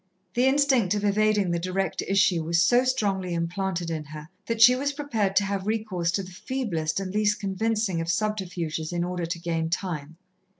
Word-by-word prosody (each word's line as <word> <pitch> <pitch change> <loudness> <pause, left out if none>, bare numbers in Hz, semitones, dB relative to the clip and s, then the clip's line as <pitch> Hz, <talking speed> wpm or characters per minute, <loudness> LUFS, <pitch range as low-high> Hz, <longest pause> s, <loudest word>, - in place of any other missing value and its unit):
The 250 +2 +3
instinct 265 -8 +3
of 205 - -2
evading 205 -2 +2
the 170 - 0
direct 185 +2 -2
issue 190 -3 +2
was 165 +1 +1
so 240 +8 +4
strongly 200 -8 0
implanted 170 0 -2
in 160 -2 -3
her, 150 +1 -10 0.2
that 230 -1 -2
she 245 +2 +8
was 280 +2 -1
prepared 225 -10 -1
to 205 - +4
have 195 0 -3
recourse 215 -6 -1
to 195 - 0
the 185 - -10
feeblest 180 -7 -2
and 190 -1 -5
least 210 -1 +1
convincing 200 -2 -1
of 165 - -4
subterfuges 180 -6 -2
in 175 0 -1
order 175 -1 -3
to 170 +1 -3
gain 165 -1 -2
time. 165 -3 -4
190 Hz, 185 wpm, -26 LUFS, 170-215 Hz, 0.2 s, she